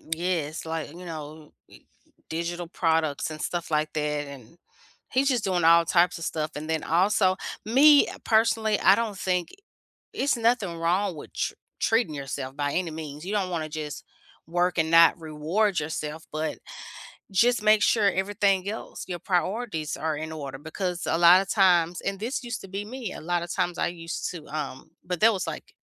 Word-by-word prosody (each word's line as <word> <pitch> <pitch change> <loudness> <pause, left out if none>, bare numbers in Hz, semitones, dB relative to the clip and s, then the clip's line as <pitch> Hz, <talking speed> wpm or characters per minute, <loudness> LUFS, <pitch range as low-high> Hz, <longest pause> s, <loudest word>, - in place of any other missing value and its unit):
Yes. 165 -3 -2
Like, 160 -2 -4
you 180 +1 -10
know, 155 -2 -8 0.8
digital 170 +1 -3
products 160 -3 0
and 155 -1 -7
stuff 170 -2 -3
like 155 0 +1
that, 150 -1 -1
and 140 +2 -12 0.5
he's 270 +2 +2
just 245 -5 +1
doing 180 -3 0
all 170 +1 +6
types 175 +1 +3
of 165 - -5
stuff, 155 -1 -2
and 155 +2 -6
then 160 -1 -1
also 185 +2 +3 0.3
me, 280 +6 +6 0.2
personally, 220 -1 +2
I 195 - +7
don't 220 -3 -2
think 180 -2 -1 0.7
it's 275 -2 +1
nothing 225 -7 +1
wrong 180 +2 0
with 150 - -10
tre - - -2 0.2
treating 225 -8 +2
yourself 135 -1 -5
by 145 -1 -1
any 180 -2 -1
means. 155 -1 -7
You 200 - -3
don't 195 -3 0
wanna 160 -3 -2
just 150 -1 -6 0.4
work 175 +2 0
and 160 0 +2
not 165 0 +6
reward 165 +6 0
yourself, 155 +1 -5
but 155 +1 -3 0.7
just 235 +4 +3
make 215 0 +5
sure 205 -3 +4
everything 195 0 +1
else, 220 +2 -6
your 175 -1 -4
priorities 185 -3 -1
are 160 0 -2
in 155 +1 -5
order 140 -4 -6
because 175 +4 -4
a - - +1
lotta 175 +3 +7
times 180 -4 +3
and 195 0 -3
this 255 +5 -3
used 240 0 -4
to 195 - -10
be 195 +2 -4
me, 235 -2 -6
a - - -8
lotta 175 +1 -1
times 175 -1 -1
I - - +1
used 165 0 -5
to, 165 -4 -9
um 145 -3 -5
but 180 -1 -3
that 225 +1 +6
was, 195 - -3
like, - - -7
175 Hz, 180 wpm, -26 LUFS, 155-200 Hz, 0.8 s, I